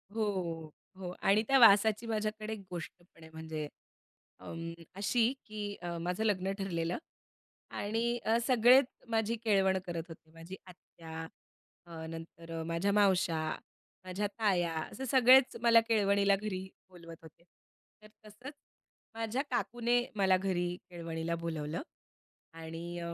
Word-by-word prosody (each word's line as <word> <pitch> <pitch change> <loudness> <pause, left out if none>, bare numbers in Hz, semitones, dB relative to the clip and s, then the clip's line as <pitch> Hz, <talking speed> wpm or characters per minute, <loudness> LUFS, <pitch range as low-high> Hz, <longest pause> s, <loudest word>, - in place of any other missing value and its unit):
हो. 175 -7 -2 0.3
हो 185 -2 -5
आणि 200 +2 +4
त्या 270 - +5
वासाची 215 0 +6
माझ्याकडे 215 0 -2
एक 215 - -6
गोष्ट 175 -2 -5 0.2
पण 165 - -17
आहे 160 - -12
म्हणजे 160 -1 -5 0.7
अ, - - -14 0.5
अशी 225 +5 +2
की 210 -1 -5
अ, 175 -1 -4
माझं 180 +5 -2
लग्न 195 -3 +1
ठरलेलं 175 -3 -2 0.7
आणि 230 +3 -1
अ, 225 +1 +3
सगळेच 250 +2 +6 0.2
माझी 225 0 +1
केळवण 195 -3 +3
करत 170 -2 -4
होते 160 -1 -13
माझी 165 +3 -9
आत्या 165 -3 -11 0.7
अ, 165 -2 -8
नंतर 165 0 -7
माझ्या 170 +4 0
मावश्या 190 -5 +3 0.7
माझ्या 190 +3 -2
ताया 180 -6 +2
असे 260 +11 -6
सगळेच 260 +1 +6
मला 230 -1 +7
केळवणीला 200 -2 +3
घरी 195 -2 -4 0.2
बोलवत 170 -2 -12
होते. 160 +1 -16 0.6
तर - - -13 0.2
तसंच 215 +7 -10 0.6
माझ्या 225 +3 -2
काकूने 240 0 +1
मला 190 -2 +4
घरी 180 -2 -1
केळवणीला 170 -1 -4
बोलावलं 165 - -4 0.7
आणि 165 +1 -7
190 Hz, 125 wpm, -32 LUFS, 170-220 Hz, 0.7 s, मला